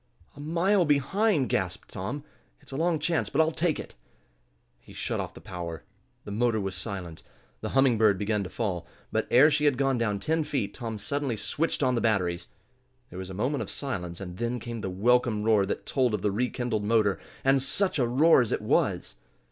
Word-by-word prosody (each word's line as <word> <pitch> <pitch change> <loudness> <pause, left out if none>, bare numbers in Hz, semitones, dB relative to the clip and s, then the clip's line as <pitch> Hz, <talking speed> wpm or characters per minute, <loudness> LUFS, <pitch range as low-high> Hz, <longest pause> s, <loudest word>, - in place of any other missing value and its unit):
"A - - -13
mile 175 +6 +2
behind!" 150 - +2
gasped - - -2
Tom. 120 +10 -4 0.4
"It's - - -17
a - - -5
long 165 +2 +1
chance, 155 +2 0
but 140 - -1
I'll 160 0 +4
take 165 0 0
it." - - -8 0.9
He - - -16
shut - - -3
off - - -5
the - - -11
power. 85 -2 -6 0.4
The 105 - -6
motor 115 +1 +1
was 95 -1 -3
silent, 95 -4 -6 0.4
the - - -4
Humming 130 -5 +4
Bird 105 -3 +4
began 105 +1 0
to 90 - -6
fall. 95 -6 -3 0.2
But - - 0
ere 145 +6 +6
she 150 0 +1
had 145 -4 +3
gone 135 -2 +1
down 105 -3 0
ten 160 +7 0
feet 135 -9 -2
Tom 115 -3 -5
suddenly 135 +2 -2
switched 155 +6 -1
on 130 -1 +3
the 120 - 0
batteries. 90 -6 0 0.6
There 90 - -7
was 95 0 -6
a 95 - -7
moment 130 +8 -1
of - - -5
silence, 90 -11 -4
and 90 -2 -7
then 120 +2 -2
came 115 0 -6
the 95 - -3
welcome 110 +2 +2
roar 105 -3 +3
that - - -3
told 125 -5 +1
of 100 - -5
the 105 - +2
rekindled 120 0 -1
motor. 105 -4 +2 0.2
And 135 0 +4
such 185 +5 0
a 125 - +3
roar 140 +5 +5
as 120 - -1
it - - -1
was! - - +1
120 Hz, 205 wpm, -27 LUFS, 100-145 Hz, 0.9 s, ere